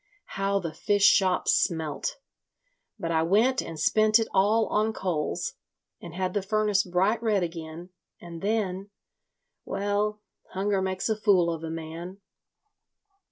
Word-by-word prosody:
How 195 Hz, 0 st, 0 dB
the 170 Hz, -5 st, -4 dB
fish 205 Hz, +4 st, 0 dB
shops 190 Hz, -3 st, +4 dB
smelt! 160 Hz, -, -1 dB, 0.8 s
But 165 Hz, -, -3 dB
I 160 Hz, -1 st, +2 dB
went 220 Hz, +10 st, +3 dB
and 165 Hz, -2 st, -8 dB
spent 215 Hz, +6 st, +4 dB
it 225 Hz, -, -1 dB
all 215 Hz, +4 st, +3 dB
on 215 Hz, +1 st, 0 dB
coals, 175 Hz, -7 st, -2 dB, 0.5 s
and 170 Hz, -1 st, -9 dB
had 185 Hz, 0 st, -2 dB
the 205 Hz, -, 0 dB
furnace 210 Hz, 0 st, +1 dB
bright 190 Hz, +5 st, 0 dB
red 210 Hz, -5 st, +1 dB
again, 165 Hz, +1 st, -7 dB, 0.3 s
and 170 Hz, -1 st, -9 dB
then—Well, 205 Hz, 0 st, -4 dB, 0.3 s
hunger 195 Hz, 0 st, 0 dB
makes 190 Hz, -1 st, -2 dB
a 220 Hz, -, +1 dB
fool 190 Hz, -5 st, +3 dB
of 165 Hz, 0 st, -7 dB
a 165 Hz, -, -4 dB
man. 165 Hz, +4 st, -7 dB
190 Hz, 135 wpm, -27 LUFS, 170-210 Hz, 0.8 s, shops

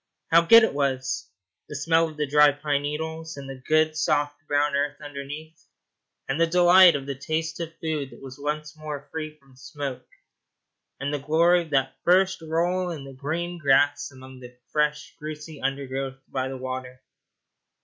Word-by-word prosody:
How 165 Hz, +1 st, +7 dB
good 230 Hz, +7 st, +8 dB
it 225 Hz, -, +1 dB
was 130 Hz, -2 st, -1 dB, 0.4 s
the 150 Hz, -, -6 dB
smell 165 Hz, +3 st, +2 dB
of 155 Hz, -, -13 dB
the 150 Hz, -, 0 dB
dry 150 Hz, +1 st, +6 dB
pine 145 Hz, 0 st, -1 dB
needles 160 Hz, +2 st, -4 dB
and 140 Hz, -1 st, -8 dB
the 135 Hz, -, -6 dB
good, 155 Hz, 0 st, +3 dB
soft 145 Hz, -2 st, +1 dB
brown 145 Hz, 0 st, +1 dB
earth 145 Hz, +1 st, -1 dB
underneath, 145 Hz, +2 st, -9 dB, 0.6 s
and 135 Hz, +5 st, -1 dB
the 165 Hz, -, +5 dB
delight 180 Hz, 0 st, +7 dB
of 140 Hz, -1 st, -4 dB
the 140 Hz, -, -3 dB
taste 160 Hz, +4 st, -3 dB
of 165 Hz, -1 st, -5 dB
food 155 Hz, -4 st, -3 dB
that -, -, -14 dB
was 135 Hz, 0 st, -10 dB
once 150 Hz, +2 st, -3 dB
more 150 Hz, -2 st, -7 dB
free 155 Hz, -1 st, -5 dB
from 135 Hz, -3 st, -23 dB
smoke, 130 Hz, -2 st, -6 dB, 0.9 s
and 140 Hz, +2 st, -2 dB
the 145 Hz, -, -1 dB
glory 170 Hz, +5 st, +3 dB
of 165 Hz, -, -9 dB
that 135 Hz, -2 st, 0 dB
first 185 Hz, +1 st, +3 dB
roll 175 Hz, +3 st, 0 dB
in 160 Hz, -5 st, -6 dB
the 135 Hz, 0 st, -10 dB
green 170 Hz, +6 st, -4 dB
grass 145 Hz, 0 st, +3 dB
among 130 Hz, -1 st, -13 dB
the 125 Hz, 0 st, -13 dB
fresh, 150 Hz, 0 st, -1 dB
juicy 150 Hz, 0 st, -8 dB
undergrowth 135 Hz, 0 st, -3 dB
by 130 Hz, -1 st, -2 dB
the 135 Hz, 0 st, -5 dB
water! 130 Hz, 0 st, -6 dB
150 Hz, 175 wpm, -25 LUFS, 135-160 Hz, 0.9 s, good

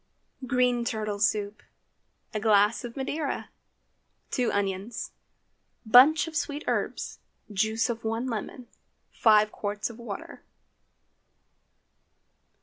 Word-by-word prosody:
GREEN 250 Hz, -2 st, +2 dB
TURTLE 215 Hz, -3 st, -3 dB
SOUP. 210 Hz, 0 st, 0 dB, 0.7 s
A 215 Hz, -, -1 dB
glass 210 Hz, +1 st, +3 dB
of 240 Hz, +1 st, -8 dB
Madeira. 285 Hz, +2 st, -3 dB, 0.8 s
2 250 Hz, -3 st, +1 dB
onions. 200 Hz, +2 st, -2 dB, 0.7 s
Bunch 265 Hz, +9 st, +7 dB
of 320 Hz, -, -8 dB
sweet 295 Hz, -1 st, -2 dB
herbs. -, -, -2 dB, 0.3 s
Juice 220 Hz, +3 st, +1 dB
of 230 Hz, -2 st, -4 dB
one 225 Hz, +2 st, -2 dB
lemon. 240 Hz, +1 st, -5 dB, 0.4 s
5 215 Hz, -1 st, +4 dB
qts 205 Hz, +2 st, -3 dB
of 230 Hz, -, -14 dB
water. 220 Hz, -4 st, -8 dB
225 Hz, 100 wpm, -27 LUFS, 210-250 Hz, 0.8 s, Bunch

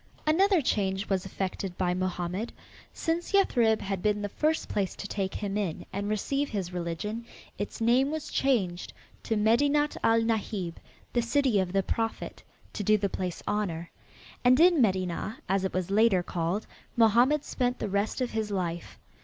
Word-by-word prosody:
Another 360 Hz, +2 st, +4 dB
change 195 Hz, -4 st, 0 dB
was 195 Hz, -1 st, 0 dB
effected 190 Hz, -1 st, -4 dB
by 180 Hz, -1 st, +1 dB
Mohammed. 185 Hz, +3 st, -2 dB, 0.4 s
Since 335 Hz, +3 st, -2 dB
Yathrib 235 Hz, -, +3 dB
had 195 Hz, -2 st, -3 dB
been 210 Hz, 0 st, +1 dB
the 205 Hz, -, -2 dB
first 310 Hz, +8 st, 0 dB
place 195 Hz, -3 st, -1 dB
to 200 Hz, -, -6 dB
take 195 Hz, -2 st, -3 dB
him 200 Hz, -1 st, -3 dB
in 200 Hz, -6 st, -2 dB
and 200 Hz, +1 st, -2 dB
receive 275 Hz, +7 st, -1 dB
his 190 Hz, -5 st, -3 dB
religion, 180 Hz, +6 st, -3 dB, 0.4 s
its 205 Hz, -, -4 dB
name 245 Hz, +4 st, +3 dB
was 310 Hz, -1 st, -4 dB
changed 195 Hz, -10 st, 0 dB, 0.3 s
to 225 Hz, -, -1 dB
Medinat 285 Hz, +8 st, +3 dB
al 225 Hz, 0 st, +4 dB
Nahib, 210 Hz, -6 st, -2 dB, 0.4 s
the 240 Hz, -, +3 dB
city 245 Hz, -2 st, +2 dB
of 185 Hz, -2 st, -1 dB
the 195 Hz, 0 st, +1 dB
prophet, 225 Hz, +4 st, -3 dB, 0.3 s
to -, -, -4 dB
do 215 Hz, +2 st, +4 dB
the 200 Hz, -1 st, -1 dB
place 180 Hz, -2 st, -4 dB
honor. 175 Hz, -6 st, -2 dB, 0.5 s
And 255 Hz, +2 st, +5 dB
in 340 Hz, -3 st, +6 dB
Medinah, 190 Hz, 0 st, 0 dB
as 195 Hz, 0 st, +1 dB
it 190 Hz, -, -2 dB
was 185 Hz, 0 st, -1 dB
later 205 Hz, -3 st, +4 dB
called, 175 Hz, +4 st, -2 dB, 0.3 s
Mohammed 240 Hz, +6 st, +4 dB
spent 250 Hz, -1 st, -1 dB
the -, -, -3 dB
rest 200 Hz, +5 st, -1 dB
of 250 Hz, -, -1 dB
his 220 Hz, -1 st, -2 dB
life. 175 Hz, -4 st, -3 dB
210 Hz, 170 wpm, -28 LUFS, 190-240 Hz, 0.5 s, in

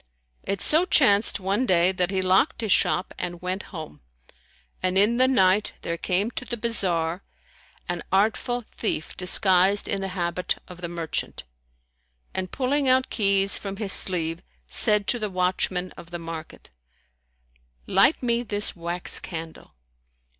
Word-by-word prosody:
It 195 Hz, -1 st, -3 dB
so 320 Hz, +4 st, +5 dB
chanced 215 Hz, -, +3 dB
one 200 Hz, +7 st, -1 dB
day 175 Hz, 0 st, +3 dB
that 180 Hz, -1 st, -1 dB
he 190 Hz, -1 st, -1 dB
locked 190 Hz, +9 st, +2 dB
his 220 Hz, -3 st, -2 dB
shop 180 Hz, -, +1 dB
and 175 Hz, 0 st, -4 dB
went 185 Hz, +2 st, -3 dB
home, 155 Hz, -, -9 dB, 0.8 s
and 185 Hz, 0 st, 0 dB
in 210 Hz, +4 st, +3 dB
the 255 Hz, +1 st, +4 dB
night 200 Hz, -5 st, +2 dB
there 170 Hz, -, -2 dB
came 190 Hz, +6 st, -1 dB
to 255 Hz, -, -5 dB
the 240 Hz, -1 st, -5 dB
bazar 180 Hz, -7 st, -1 dB, 0.7 s
an 175 Hz, -, -3 dB
artful 225 Hz, +5 st, 0 dB
thief 185 Hz, -8 st, -3 dB
disguised 190 Hz, +1 st, +3 dB
in 200 Hz, -, -1 dB
the 195 Hz, -, -3 dB
habit 175 Hz, +1 st, -1 dB
of 180 Hz, -1 st, -12 dB
the 175 Hz, -, -4 dB
merchant, 165 Hz, -, -4 dB, 0.9 s
and 185 Hz, -1 st, -3 dB
pulling 275 Hz, +1 st, 0 dB
out 260 Hz, 0 st, +2 dB
keys 195 Hz, -2 st, +2 dB
from 195 Hz, -1 st, -6 dB
his 205 Hz, -3 st, +2 dB
sleeve, 165 Hz, -3 st, +2 dB, 0.3 s
said 210 Hz, -, +2 dB
to 240 Hz, -, 0 dB
the 215 Hz, -1 st, -2 dB
watchman 185 Hz, 0 st, -1 dB
of 170 Hz, -, -13 dB
the 175 Hz, -, -5 dB
market, 165 Hz, -, -9 dB, 1.1 s
"Light 275 Hz, -, +3 dB
me 235 Hz, -1 st, +1 dB
this 210 Hz, -3 st, +1 dB
wax 175 Hz, +1 st, -2 dB
candle." 165 Hz, -, -9 dB
190 Hz, 150 wpm, -24 LUFS, 175-215 Hz, 1.1 s, so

